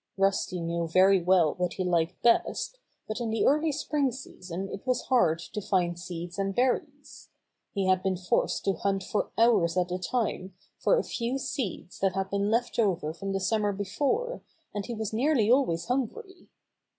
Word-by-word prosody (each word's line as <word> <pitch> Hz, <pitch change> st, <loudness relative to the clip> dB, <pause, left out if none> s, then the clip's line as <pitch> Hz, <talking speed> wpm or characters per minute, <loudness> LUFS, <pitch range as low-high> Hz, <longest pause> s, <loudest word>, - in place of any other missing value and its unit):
Rusty 195 Hz, -1 st, +1 dB
knew 170 Hz, 0 st, -2 dB
very 185 Hz, +3 st, +5 dB
well 175 Hz, -3 st, +4 dB
what 180 Hz, -1 st, 0 dB
he 185 Hz, -, -2 dB
liked 170 Hz, -1 st, 0 dB
best, 370 Hz, -, +2 dB, 0.3 s
but 215 Hz, +3 st, -4 dB
in 230 Hz, -, -1 dB
the 220 Hz, 0 st, +1 dB
early 305 Hz, +3 st, +3 dB
spring 290 Hz, -2 st, 0 dB
season 190 Hz, -7 st, -7 dB
it 195 Hz, -, -6 dB
was 255 Hz, -1 st, 0 dB
hard 180 Hz, -11 st, +3 dB
to 190 Hz, +5 st, -6 dB
find 175 Hz, -3 st, 0 dB
seeds 175 Hz, +1 st, -6 dB
and 195 Hz, 0 st, -1 dB
berries. 285 Hz, +3 st, -2 dB, 0.5 s
He 195 Hz, -1 st, 0 dB
had 185 Hz, 0 st, +3 dB
been 190 Hz, -1 st, 0 dB
forced 180 Hz, 0 st, 0 dB
to 195 Hz, -, +2 dB
hunt 195 Hz, 0 st, -1 dB
for 205 Hz, -, -1 dB
hours 205 Hz, -7 st, +4 dB
at 180 Hz, 0 st, +1 dB
a 180 Hz, -, -1 dB
time 190 Hz, -3 st, -2 dB, 0.2 s
for -, -, +3 dB
a -, -, +1 dB
few 240 Hz, +2 st, -2 dB
seeds 215 Hz, -9 st, -4 dB
that 195 Hz, -1 st, +1 dB
had 195 Hz, 0 st, -2 dB
been 200 Hz, +1 st, 0 dB
left 240 Hz, +2 st, 0 dB
over 175 Hz, -8 st, +1 dB
from 195 Hz, +3 st, -5 dB
the 195 Hz, -, 0 dB
summer 210 Hz, +1 st, +1 dB
be 200 Hz, +1 st, -3 dB
fore, 360 Hz, -, -1 dB, 0.3 s
and 205 Hz, -1 st, -4 dB
he 235 Hz, -, -4 dB
was 220 Hz, -1 st, -4 dB
nearly 240 Hz, -2 st, +2 dB
always 170 Hz, -11 st, +2 dB
hungry. 310 Hz, -, -3 dB
195 Hz, 185 wpm, -28 LUFS, 180-245 Hz, 0.5 s, very